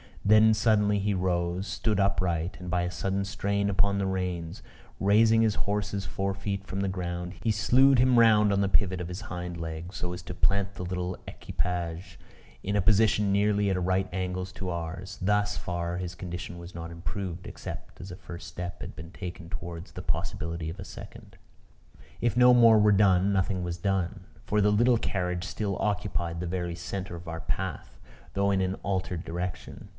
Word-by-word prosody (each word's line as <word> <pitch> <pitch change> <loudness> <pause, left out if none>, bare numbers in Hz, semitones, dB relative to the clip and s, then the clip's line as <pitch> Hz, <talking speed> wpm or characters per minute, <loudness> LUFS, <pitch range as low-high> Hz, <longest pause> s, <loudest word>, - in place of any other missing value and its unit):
Then 110 +2 +7
suddenly 105 -1 +3
he 100 +1 +1
rose; 90 +1 0
stood 105 -3 0
upright; 90 -3 0
and, 90 0 -7
by 90 0 +1
a 90 - -2
sudden 95 +1 -1
strain 100 0 0
upon 100 0 +2
the 100 - 0
reins, 90 -2 -3 0.4
raising 110 +3 +5
his 110 -2 +3
horse's 100 -1 -1
forefeet 100 0 -3
from 95 - -4
the 100 - 0
ground, 90 -1 -3
he 115 - +2
slewed 125 +5 +5
him 125 0 +5
round 105 -3 +6
on 100 - +2
the 100 - +1
pivot 95 -2 +2
of 85 - -4
his 90 +3 -6
hind 90 -2 -5
legs, 80 +2 -6
so 90 0 -3
as 90 - -6
to 90 - -6
plant 100 +1 +1
the - - -5
little 90 0 -3
equipage 85 0 -4 0.4
in 100 +1 -1
a 100 - +3
position 105 +1 +4
nearly 100 0 +2
at 95 -1 0
right 95 +1 +1
angles 95 0 -2
to 95 +1 -5
ours. 85 +3 -5
Thus 105 +2 +1
far 85 0 -3
his 90 -1 -4
condition 90 0 -6
was 85 +1 -10
not 85 0 -6
improved; 90 +1 -5
except - - -8
as 90 +1 -8
a - - -6
first 85 -1 -9
step 90 0 -6
had - - -7
been 85 +1 -9
taken 90 -3 -7
towards 85 -2 -6
the - - -7
possibility 80 -1 -2
of 85 +5 -7
a 95 - -6
second. - - -11 0.9
If 120 0 +1
no 125 0 +8
more 115 -2 +7
were 105 0 +5
done, 100 -1 +4
nothing 95 -1 0
was 85 -1 -3
done; 95 0 -1 0.2
for 105 0 +2
the 105 +1 +4
little 120 +3 +4
carriage 90 -4 -2
still 100 +1 -2
occupied 100 -5 -1
the 90 - -3
very 85 -1 -2
centre 95 0 -5
of 85 +1 -10
our 80 0 -4
path, - - -4 0.3
though 100 0 +2
in 95 -1 +2
an 95 0 0
altered 95 -3 -2
direction. 90 +2 -5
95 Hz, 190 wpm, -28 LUFS, 90-100 Hz, 0.9 s, no